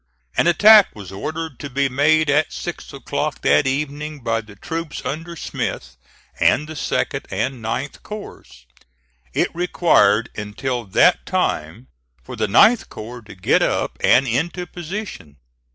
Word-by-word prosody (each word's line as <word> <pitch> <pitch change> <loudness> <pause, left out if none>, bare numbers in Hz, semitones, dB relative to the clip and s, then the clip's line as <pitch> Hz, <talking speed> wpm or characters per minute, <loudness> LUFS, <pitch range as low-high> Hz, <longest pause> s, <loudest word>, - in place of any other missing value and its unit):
An - - +2
attack 210 +4 +7
was 100 -3 -9
ordered 155 +8 -5
to 145 - -6
be 140 +1 +1
made 150 +4 +3
at 145 +1 +2
six - - -6
o'clock - - -3
that 75 - +4
evening 145 +2 -3
by 115 -1 -1
the 105 -2 -15
troops 165 - -5
under 165 +4 -5
Smith 65 - -5 0.4
and 150 +3 +3
the 160 - -7
2d 150 - -2
and 130 -3 -3
9th 130 +5 -4
corps. 200 - -10 0.7
It - - +1
required 125 - +2
until 115 +4 -4
that 95 - +3
time 80 +11 -2 0.4
for - - -8
the - - -1
9th 220 - +5
corps 120 +3 -9
to 105 -2 -13
get 95 - +2
up - - -1
and 135 +2 +4
into 165 +9 -1
position. 175 - -7
140 Hz, 145 wpm, -20 LUFS, 110-165 Hz, 0.7 s, attack